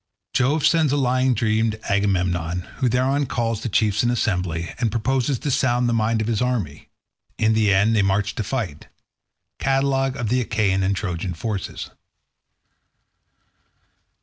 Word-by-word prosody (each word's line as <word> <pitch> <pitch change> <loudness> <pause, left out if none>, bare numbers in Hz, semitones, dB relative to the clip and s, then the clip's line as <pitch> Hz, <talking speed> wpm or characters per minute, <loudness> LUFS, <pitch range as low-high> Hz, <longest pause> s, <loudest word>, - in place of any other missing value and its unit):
Jove 140 +4 +2
sends 160 -4 +3
a 145 - +1
lying 130 -1 +2
dream 110 -1 +1
to 110 0 -5
Agamemnon, 90 -3 0 0.2
who 130 -3 +1
thereon 130 +4 +1
calls 115 -3 -1
the 120 - -3
chiefs 105 0 +2
in 120 - +1
assembly, 90 -8 -1
and 120 -2 +1
proposes 130 +4 0
to 145 - -3
sound 125 -2 +2
the 120 - +1
mind 110 0 +1
of 110 - -2
his 115 0 0
army—In 110 0 -3
the 110 -2 +3
end 100 +4 +3
they 105 - +4
march 100 +2 +1
to 110 - -3
fight—Catalogue 135 - -3
of 115 -3 -2
the 125 +2 +2
Achaean 105 -5 0
and 95 +1 +1
Trojan 90 -3 -3
forces. 100 +1 -5
115 Hz, 150 wpm, -22 LUFS, 100-125 Hz, 0.2 s, they